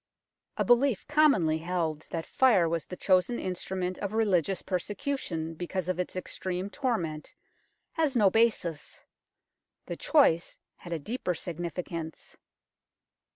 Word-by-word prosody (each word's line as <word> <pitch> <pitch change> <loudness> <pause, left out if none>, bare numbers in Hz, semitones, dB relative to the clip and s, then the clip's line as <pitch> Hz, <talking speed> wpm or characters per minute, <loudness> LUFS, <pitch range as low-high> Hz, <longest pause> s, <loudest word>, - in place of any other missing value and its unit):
A - - +1
belief 245 -2 +3
commonly 250 - +4
held 165 -3 -2
that 165 -1 -3
fire 220 -10 +4
was 165 -1 -2
the 180 - -6
chosen 185 +6 +2
instrument 185 0 -3
of 200 0 -3
religious 195 -5 +1
persecution 180 - -3
because 175 +2 -4
of 185 -1 -1
its 180 - -3
extreme 185 +1 -4
torment 175 - -2 0.6
has 310 -5 0
no 205 -5 +5
basis. 215 -9 0 0.8
The - - -4
choice 225 - +3 0.2
had 175 - -11
a 165 - 0
deeper 180 - -3
significance. 170 -1 -5
180 Hz, 120 wpm, -29 LUFS, 170-220 Hz, 0.8 s, no